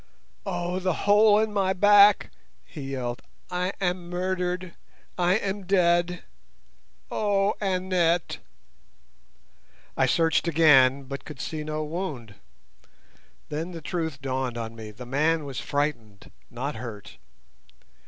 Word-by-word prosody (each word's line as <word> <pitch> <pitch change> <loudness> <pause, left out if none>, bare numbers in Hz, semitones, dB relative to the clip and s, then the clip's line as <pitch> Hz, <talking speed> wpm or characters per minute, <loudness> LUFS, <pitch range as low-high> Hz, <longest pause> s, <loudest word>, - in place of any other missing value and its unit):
"Oh, 175 -1 -2
the 185 -1 0
hole 205 +1 +6
in 215 0 0
my 190 -2 +1
back!" 205 +1 +6 0.3
he 135 -4 -7
yelled. 120 -2 -4 0.3
"I 180 +1 -1
am 180 -2 -2
murdered. 180 0 -2 0.4
I 180 +1 +2
am 200 -2 -3
dead. 175 -2 +2 0.9
Oh, 205 -1 +1
Annette!" 180 -3 0 1.6
I - - +2
searched 165 0 +2
again, 140 -5 +5
but 140 +1 -7
could 150 -4 -10
see 155 +2 -4
no 155 0 -3
wound. 150 - -5 1.2
Then 165 +4 -4
the 165 - -6
truth 160 -4 -4
dawned 130 -2 -2
on 115 -1 -5
me—the 110 +2 -9
man 150 +5 +1
was 135 -2 -5
frightened, 120 -9 -3 0.2
not 130 +4 -4
hurt. 110 -4 -9
170 Hz, 115 wpm, -26 LUFS, 135-185 Hz, 1.6 s, hole